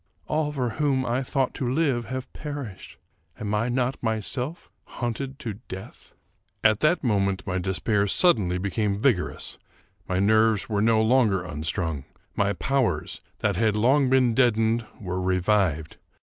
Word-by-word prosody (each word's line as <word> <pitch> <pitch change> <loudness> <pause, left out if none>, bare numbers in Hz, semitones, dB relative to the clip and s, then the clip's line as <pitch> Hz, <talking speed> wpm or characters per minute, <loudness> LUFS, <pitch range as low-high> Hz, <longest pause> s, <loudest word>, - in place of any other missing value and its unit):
All 155 -1 0
for 130 -4 -1
whom 135 -3 +2
I 125 +3 0
ought 135 -2 +2
to 125 -2 -2
live 135 -5 +1
have 130 +1 -6
perished. 140 -10 -7 0.4
Am 105 -1 -3
I 110 +3 +1
not 125 +1 -1
myself 125 - -3
hunted 130 +3 -4
to 110 -7 -6
death? 95 +1 -10 0.2
" 100 +2 -40
At 110 -1 +4
that 155 +3 +2
moment 100 -5 +1
my 95 -1 -1
despair 100 +3 0
suddenly 100 - +3
became 100 +1 -1
vigorous. 110 -7 0 0.5
My 90 - -1
nerves 110 +1 +3
were 105 -2 0
no 110 0 +4
longer 110 -6 +3
unstrung. 80 -1 -3 0.3
My 100 0 +1
powers, 135 +5 -1 0.2
that 100 -3 +1
had 110 0 +2
long 130 +5 +3
been 130 -3 +4
deadened, 115 -2 +2
were 95 -2 -3
revived. 90 -4 +1
110 Hz, 150 wpm, -25 LUFS, 100-130 Hz, 0.5 s, At